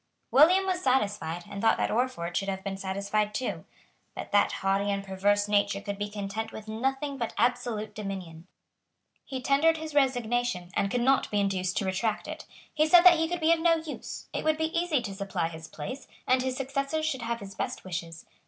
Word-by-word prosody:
William 355 +8 +6
was 370 -1 -1
satisfied, 205 - 0
and 200 0 -6
thought 225 - +4
that - - 0
Orford 215 -8 -1
should 195 0 0
have 190 0 -4
been 195 -1 -3
satisfied 200 +2 -1
too. 255 - -3 0.5
But - - -7
that 205 - +4
haughty 195 +1 0
and 200 0 -1
perverse 200 +1 +1
nature 205 -1 +2
could 200 0 -5
be 205 0 -2
content 205 +1 -4
with 215 0 -9
nothing 270 +5 -2
but 235 - -3
absolute 235 -3 0
dominion. 185 -6 -6 0.8
He 260 -2 -6
tendered 315 +5 +4
his 315 -1 -6
resignation, 245 -8 +1
and 200 - +1
could 245 +4 0
not 265 +2 +3
be 205 - 0
induced 185 -2 0
to 200 - 0
retract 205 +3 -1
it. - - -7 0.3
He 310 0 +3
said 345 +2 +7
that 350 -3 +8
he 325 - +2
could 350 +1 -2
be 320 +1 +5
of 335 - 0
no 330 0 +4
use. 320 -2 -7
It - - -2
would 315 0 +2
be 320 +1 -2
easy 335 -7 +1
to 200 -3 -5
supply 195 -4 -2
his 160 -1 -9
place; 260 - -7 0.2
and 255 0 +3
his 260 0 -2
successors 275 +3 -1
should 265 -5 -1
have 235 0 -2
his 200 -2 -9
best - - -4
wishes. 165 -2 -6
220 Hz, 205 wpm, -28 LUFS, 195-275 Hz, 0.8 s, that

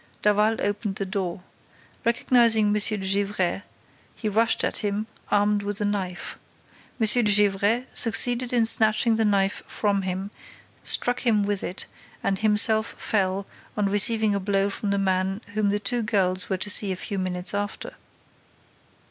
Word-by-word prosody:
Daval 210 +2 +2
opened 205 0 -2
the 195 - -3
door. 185 -2 -4 0.6
Recognizing 230 -2 +3
M. - - +1
de 210 +1 +3
Gesvres, 195 -1 0 0.5
he 220 - -5
rushed 225 +2 +1
at - - -1
him, 210 +1 -2 0.2
armed 205 0 +1
with 205 0 -4
the 210 - -2
knife. 190 -3 -4 0.6
M. 220 - +2
de 230 +3 +4
Gesvres 205 +3 +2
succeeded 240 +2 +1
in 240 -2 +2
snatching 220 0 +2
the 225 - +2
knife 200 -1 +1
from 200 -2 -1
him, 190 +2 -4 0.5
struck 245 0 +2
him 220 -4 +1
with 200 -1 -2
it 185 - -5 0.4
and 195 -1 -1
himself 220 0 +3
fell, 195 -2 -1 0.3
on 205 -1 0
receiving 215 +1 +3
a 200 - -1
blow 195 0 0
from 205 - -4
the 200 - 0
man 190 0 -1
whom 210 -1 0
the 205 - 0
two 210 +4 0
girls 185 -4 0
were 190 - -1
to 205 - +3
see 205 -1 +5
a - - -2
few 195 +2 -5
minutes 180 0 -2
after." 205 0 -4
205 Hz, 160 wpm, -24 LUFS, 195-220 Hz, 0.6 s, see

